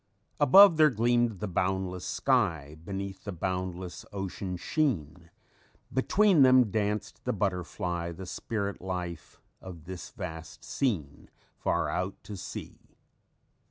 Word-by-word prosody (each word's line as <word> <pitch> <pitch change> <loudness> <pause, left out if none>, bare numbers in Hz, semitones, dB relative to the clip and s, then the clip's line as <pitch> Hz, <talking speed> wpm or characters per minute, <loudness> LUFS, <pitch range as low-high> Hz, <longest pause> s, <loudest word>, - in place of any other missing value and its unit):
_ - - +3
"_Above, 190 +3 +9
there 155 -1 +7
gleamed 120 -2 +2
the 105 - -1
boundless 90 0 -1
sky; 75 -2 0
Beneath, 95 +1 -5
the 100 - -5
boundless 90 0 -4
ocean 95 -2 -4
sheen; 85 - -1 0.6
Between 185 +6 +4
them 130 -4 +6
danced 105 0 -2
the 125 - 0
butterfly, 90 -4 -2
The 95 +3 -8
spirit 100 +1 -4
life 90 -3 -5 0.2
of 90 -4 -10
this 90 0 -7
vast 80 -3 -8
scene, 85 - -2 0.3
Far - - 0
out 90 +1 -2 0.2
at 100 - -5
sea. - - -7
95 Hz, 125 wpm, -29 LUFS, 90-115 Hz, 0.6 s, Above